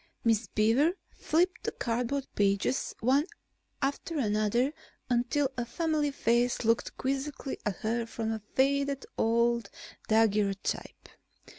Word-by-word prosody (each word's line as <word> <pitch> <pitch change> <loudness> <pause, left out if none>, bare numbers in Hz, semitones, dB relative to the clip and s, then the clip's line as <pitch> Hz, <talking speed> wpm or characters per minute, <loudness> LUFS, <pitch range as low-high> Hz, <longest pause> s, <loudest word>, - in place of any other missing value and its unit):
Miss 225 -1 +2
Beaver 230 - +3 0.2
flipped 355 +4 +1
the - - -1
cardboard 245 +3 -1
pages 200 +5 +1
one 270 +7 +3 0.6
after 285 +4 -2
another 220 +3 +1 0.4
until 260 +3 +1
a 240 - 0
familiar 300 +4 0
face 240 -2 +1
looked 230 +1 +1
quizzically 275 +1 -3
at 200 - -1
her 230 +1 -1
from 225 -1 -3
a 220 -1 -3
faded 280 +1 +2
old 235 -1 +2 0.4
daguerrotype. 210 -3 +1
240 Hz, 115 wpm, -30 LUFS, 225-280 Hz, 0.6 s, Beaver